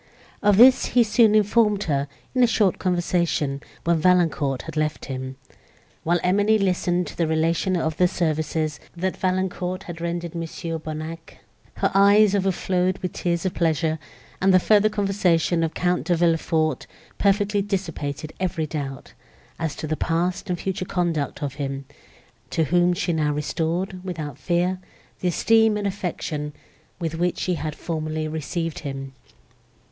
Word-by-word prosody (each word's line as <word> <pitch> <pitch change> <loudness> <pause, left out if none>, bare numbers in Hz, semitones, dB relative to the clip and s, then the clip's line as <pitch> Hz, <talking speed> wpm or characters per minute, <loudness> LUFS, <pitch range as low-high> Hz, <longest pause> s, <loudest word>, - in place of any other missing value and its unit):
Of 205 -2 +4
this 255 +3 +7
he 240 - +8
soon 220 -1 +4
informed 210 -1 +3
her, 140 -5 0 0.3
in 255 - +2
a - - +6
short 210 -5 +2
conversation, 170 -6 0 0.2
when 170 -1 +2
Valancourt 160 -6 +2
had - - -8
left 155 -1 -1
him. 130 0 -5 0.7
While 175 +2 +2
Emily 205 +4 +3
listened 180 -2 +1
to 170 - -3
a - - +1
relation 165 +4 +1
of 160 -1 -1
the 180 - +4
services, 155 -2 -1 0.2
that 185 +2 -2
Valancourt 185 0 -1
had 170 -1 -8
rendered 170 0 -3
Mons. 165 -1 -6 0.2
Bonnac, 160 +1 -7 0.4
her - - 0
eyes 200 +1 +6
overflowed 185 -1 +1
with 180 - -2
tears 170 0 -1
of 185 - 0
pleasure, 160 -1 0 0.4
and 190 +1 +4
the 185 - +6
further 210 +3 +4
conversation 195 -5 +1
of 165 -1 -1
Count 180 0 0
De 175 - +3
Villefort 165 -2 +1 0.3
perfectly 205 0 +2
dissipated 165 -7 -4
every 170 -4 -1
doubt, 140 -3 -6 0.5
as 160 -2 -2
to - - -5
the 155 +1 -1
past 170 +4 -1
and 175 -1 -1
future 190 -1 -2
conduct 165 -5 -1
of 140 -2 -2
him, 135 0 -4 0.6
to 165 - +1
whom 175 +3 +3
she 180 -1 -1
now 150 -2 +1
restored, 165 +5 -2
without 155 -7 -5
fear, 175 +5 0 0.4
the 180 - -1
esteem 220 +4 +3
and 205 - -3
affection, 160 -6 -3 0.5
with 165 -3 -2
which 175 +2 0
she 185 - -1
had 155 -3 -3
formerly 155 -1 -3
received 160 +1 -3
him. 135 -2 -6
175 Hz, 150 wpm, -23 LUFS, 155-190 Hz, 0.7 s, he